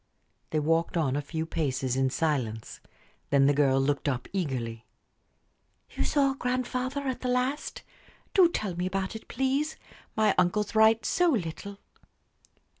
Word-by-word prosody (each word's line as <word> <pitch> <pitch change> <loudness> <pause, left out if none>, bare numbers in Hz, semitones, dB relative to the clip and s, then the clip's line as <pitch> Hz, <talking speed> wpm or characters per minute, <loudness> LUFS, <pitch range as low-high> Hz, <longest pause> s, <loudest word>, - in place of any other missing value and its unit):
They 155 - 0
walked 165 +3 +1
on 140 -5 +1
a 145 - 0
few 160 +3 -4
paces 130 -6 -1
in 135 0 +2
silence. 115 - -2 0.5
Then 140 -1 +4
the 145 - +4
girl 135 -2 +3
looked 140 +2 0
up 125 -2 -3
eagerly. 125 - -3 1.0
"You - - -2
saw 275 -2 +2
grandfather 255 +1 -2
at 265 -3 -3
the 255 - -2
last? 250 +4 -1 0.5
Do 370 -4 +6
tell 205 - -3
me 180 +1 -1
about 190 +2 -2
it, 220 - -9
please. 270 +4 -1 0.4
My 215 -2 +3
uncles 200 +5 +1
write 220 0 +5
so 355 -1 +3
little." 200 - -3
180 Hz, 145 wpm, -28 LUFS, -, 1.0 s, Do